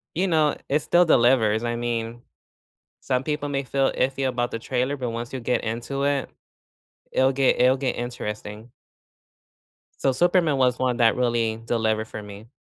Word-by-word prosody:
you 185 +4 +1
know, 155 -4 +2
it 145 - +2
still 175 +4 +3
delivers. 120 -6 +3
I 120 0 -1
mean, 120 0 -3 0.8
some 130 +1 -1
people 150 -1 -2
may 140 -1 -2
feel 135 +1 0
iffy 135 +1 0
about 120 -1 -1
the 115 - -3
trailer, 130 +3 -1
but 125 -3 -3
once 115 +2 -5
you 130 - -4
get 125 +1 -1
into 120 +5 -3
it, 140 -3 0 0.8
it'll 130 +1 +3
get 135 0 +2
it'll 130 +1 +5
get 130 -2 -1
interesting. 110 -2 -6 1.3
So 135 - +4
Superman 170 0 +2
was 125 -1 +2
one 125 -1 0
that 115 -2 +4
really 115 -2 0
delivered 110 -2 0
for 105 - -7
me. 105 +2 -11
125 Hz, 165 wpm, -24 LUFS, 115-135 Hz, 1.3 s, it'll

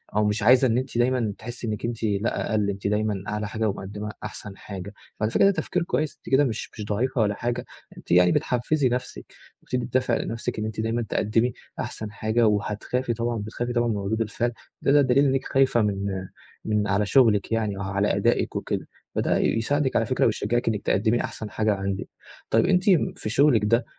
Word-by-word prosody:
أو 105 0 +3
مش 105 +1 0
عايزة 125 +4 +6
إن 115 0 +1
أنتِ 130 -1 -3
دايمًا 120 -3 +1
تحسي 120 +1 -7
إنكِ 105 0 -3
أنتِ 115 -1 -4
لا 105 +1 -1
أقل، 105 -2 +1
أنتِ 100 0 -3
دايمًا 105 -2 0
أعلى 105 0 -2
حاجة 110 0 -1
ومقدِمّة 105 +2 -5
أحسن 105 -2 -7
حاجة، 100 0 -8 0.3
وعلى 110 +1 0
فكرة - - +3
ده 200 - +6
تفكير 180 -2 -1
كويس، 150 -1 -1
أنتِ - - -12
كده 135 +2 +5
مش 115 -5 -2
مش 105 - -6
ضعيفة 115 +4 0
ولا 105 -1 +2
حاجة، 120 +2 -2 0.3
أنتِ - - -10
يعني 90 0 +6
بتحفّزي 130 +3 +1
نَفسِك، 125 - -4 0.4
وبتدّي 125 -1 -2
دافع 125 +1 +1
لنَفسِك 115 -1 -3
إن 110 - -2
أنتِ 110 0 -5
دايمًا 115 +2 -1
تقدِّمي 115 +4 +1 0.3
أحسن 110 -1 -5
حاجة، 110 +2 +1
وهتخافي 105 +4 -1
طبعًا 120 +1 -2
بتخافي 115 +3 -4
طبعًا 120 0 +2
من 110 -3 0
ردود 100 +3 -1
الفعل، 115 +2 -1 0.3
ده - - +2
ده 145 0 +6
دليل 135 +2 +4
إنكِ 135 -1 +1
خايفة 135 -3 +3
من 100 -2 -2 0.4
من 105 -1 +1
على 100 +1 +1
شغلِك 110 -4 +3
يعني 110 -3 0
أو - - -5
على 100 +1 0
أدائِك - - +1
وكده، - - -3 0.3
فده - - +1
يساعدِك 135 +5 +1
على 115 - +3
فكرة 130 +3 +1
ويشجعِك 115 +2 0
إنكِ 105 -2 0
تقدمي 110 +4 +1
أحسن 110 - -6
حاجة 110 0 +1
عندِك، 95 0 -3 0.4
طيب 115 - +3
أنتِ 180 -1 +3 0.4
في - - -4
شغلِك 130 -1 +4
ده 115 +4 +2
110 Hz, 200 wpm, -25 LUFS, 105-120 Hz, 0.4 s, عايزة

